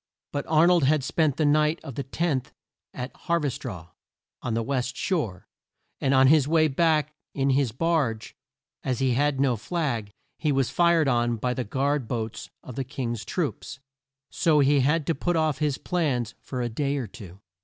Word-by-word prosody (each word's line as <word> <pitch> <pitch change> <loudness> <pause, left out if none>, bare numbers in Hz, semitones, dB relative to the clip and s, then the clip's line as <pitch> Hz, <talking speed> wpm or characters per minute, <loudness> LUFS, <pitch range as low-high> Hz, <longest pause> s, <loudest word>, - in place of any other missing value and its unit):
But 145 -1 -3
Ar 160 +1 +5
nold 175 -4 +4
had 150 0 +3
spent 155 0 +1
the 155 - +2
night 150 +2 +3
of 135 - -7
the 140 - -4
10th 135 0 -1 0.4
at 125 0 -6
Hav 170 -3 +1
er 140 - +1
straw, 90 -10 -7 0.5
on 115 - -2
the 115 - 0
west 130 0 -2
shore, 110 - -2 0.5
and 135 - +1
on 130 0 +6
his 145 0 +5
way 160 0 +4
back 155 0 +1 0.2
in 135 0 +2
his 135 -3 +2
barge, 135 -5 -1 0.5
as 130 -2 -1
he 130 0 +1
had 145 +1 +1
no 135 -3 +3
flag, 120 - -2 0.3
he 155 - +1
was 135 -2 +1
fired 170 -3 +3
on 120 -2 +2
by 125 +3 -1
the 125 - -2
guard 135 +3 -1
boats 110 -1 -4
of 130 - -9
the 135 - -3
King's 120 -4 -4
troops. 160 -5 -3 0.5
So 160 -3 +2
he 145 0 +4
had 150 +4 +2
to 165 - +1
put 175 +5 -1
off 155 -3 +1
his 150 -2 0
plans 135 - -1
for 125 -2 -4
a - - 0
day 140 +5 -1
or 130 - -2
two. 95 -2 -12
135 Hz, 190 wpm, -26 LUFS, 125-155 Hz, 0.5 s, on